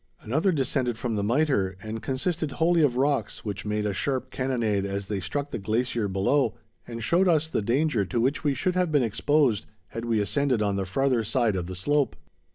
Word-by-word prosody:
Another 155 - +1
descended 130 -5 0
from 120 -1 -2
the 105 - 0
Mitre 110 -6 +1
and 110 +1 -5
consisted 155 +3 -2
wholly 170 +1 +3
of 130 -5 +2
rocks, 140 -2 0
which 100 -1 -4
made 105 0 -1
a 105 - 0
sharp 130 +4 -2
cannonade 115 -6 0
as 100 0 -3
they 100 -1 -3
struck 145 +9 -3
the - - -3
glacier 115 +2 0
below, 100 +9 +1 0.3
and 115 -1 -6
showed 175 - +3
us 160 -3 +3
the 160 - -1
danger 125 +1 +1
to 115 +5 -2
which 135 +5 0
we 145 -3 +1
should 180 +8 0
have 180 -2 +1
been 145 -4 +3
exposed 125 0 +1 0.2
had 115 0 -5
we 115 -2 +1
ascended 130 +4 +1
on 100 -2 +1
the 95 -1 -2
farther 130 +3 +1
side 110 -1 +1
of 90 -2 -3
the 95 - -6
slope. 140 - +1
125 Hz, 205 wpm, -26 LUFS, 105-145 Hz, 0.3 s, wholly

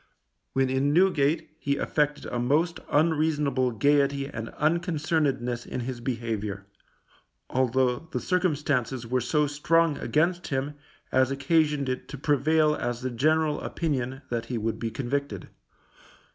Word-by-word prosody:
When 135 0 +2
in 135 +2 +1
Newgate 160 -4 +2
he 140 -2 0
affected 150 -1 0
a 120 - -3
most 150 +8 +1
unreasonable 150 -4 +2
gaiety 140 +3 +2
and 115 -5 -6
unconcernedness 155 -7 0
in 125 - -4
his 120 0 -5
behaviour, 110 -5 -3 0.9
although 130 +3 +1
the - - -1
circumstances 145 -9 0
were 125 +2 0
so 150 +5 +2
strong 150 +2 +2
against 175 +3 +1
him 135 +1 -2 0.4
as 130 0 +3
occasioned 145 +1 +1
it 130 0 -3
to 145 - -7
prevail 150 +2 +3
as 120 -3 -3
the 130 0 -2
general 155 +4 +1
opinion 135 -4 -2
that 115 -1 -1
he 120 0 -3
would 110 0 -2
be 115 - -2
convicted. 125 -2 -3
140 Hz, 130 wpm, -27 LUFS, 125-155 Hz, 0.9 s, as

